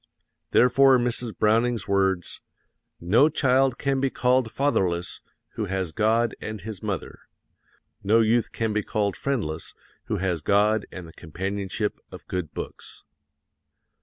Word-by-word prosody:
Therefore 130 +1 +5
Mrs. 120 -1 -2
Browning's 115 0 +2
words, 95 -3 0 0.6
"No 115 - +4
child 135 -3 +2
can 140 -1 0
be 135 0 +1
called 125 -2 +1
fatherless 95 -12 0 0.3
who - - -4
has 95 -3 -2
God 110 +5 +1
and 110 0 -5
his 105 -1 -7
mother; 100 -6 -5 0.8
no 110 +3 +4
youth 115 +1 +2
can 110 -2 -2
be 105 - +1
called 100 -1 -1
friendless 105 - -3 0.3
who - - -2
has 90 -3 -1
God 105 +4 +2
and 90 -3 -8
the 80 - -14
companionship 95 +5 -4
of - - -11
good 90 -4 -3
books." - - -8
110 Hz, 135 wpm, -25 LUFS, 95-125 Hz, 0.8 s, Therefore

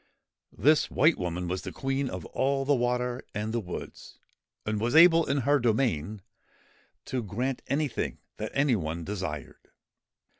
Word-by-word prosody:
This 155 +2 +4
White 155 +4 +3
Woman 90 0 -3
was 90 +1 -2
the - - -6
Queen 135 0 -2
of - - -6
all 135 +1 0
the 145 - +3
water 125 0 0
and 105 +2 -2
the 120 - +1
woods, 90 -5 -8 0.5
and 105 0 -1
was 120 +4 0
able, 165 0 +7
in 140 0 +1
her 145 +3 +3
domain, 110 - 0 0.8
to 130 - -2
grant 120 +5 -3
anything 145 -1 -1 0.2
that 110 - -4
any 140 -3 +3
one 85 -3 -3
desired. 80 -7 -6
120 Hz, 150 wpm, -28 LUFS, 100-140 Hz, 0.8 s, able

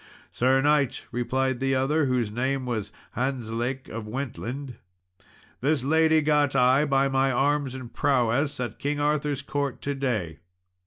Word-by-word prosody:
"Sir 130 +2 +2
knight," 145 -3 +2
replied 130 +1 -1
the 135 0 +1
other, 140 +3 +1
whose 125 -4 0
name 130 +3 -1
was 110 -4 -3 0.2
Hantzlake 125 0 -2
of 110 -1 -6
Wentland, 125 +1 -5 0.8
"this 140 0 +1
lady 160 +2 +3
got 145 -2 +2
I, 130 +3 +4
by 135 -1 +2
my 135 0 +2
arms 140 +1 +1
and 130 -3 -8
prowess, 135 +2 +1
at 120 -4 -4
King 145 +1 -1
Arthur's 145 -1 0
court 140 -1 -2
to 140 - -1
day." 110 - -2
135 Hz, 145 wpm, -26 LUFS, 125-145 Hz, 0.8 s, I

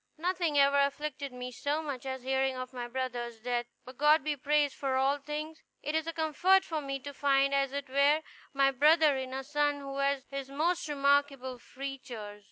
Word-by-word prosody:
Nothing 340 -2 0
ever 280 0 +5
afflicted 280 0 -1
me 250 0 -6
so 290 +5 -2
much 270 -3 -5
as 260 -1 -4
hearing 265 0 0
of 255 0 -6
my 245 -1 -4
brother's 240 -2 -4
death. 240 +1 -2 0.2
But 255 +1 -12
God 300 +1 +5
be 300 0 -1
praised 290 0 +1
for 270 -2 -2
all 270 +2 +2
things! 300 +2 -6 0.2
It 300 - -2
is 320 0 0
a - - -1
comfort 350 +5 +3
for 315 -2 -3
me 275 -1 -3
to 285 +2 -7
find, 275 0 +2
as 275 -1 +2
it 280 0 -4
were, 280 +4 +3 0.3
my 275 -2 +3
brother 300 +2 +5
in 260 -1 -4
a 265 +1 -4
son 290 +1 0
who 275 -1 -6
has 275 -1 +1
his 275 -1 -5
most 315 +3 0
remarkable 280 -3 +1
features." 245 -6 -7
275 Hz, 195 wpm, -30 LUFS, 260-295 Hz, 0.3 s, ever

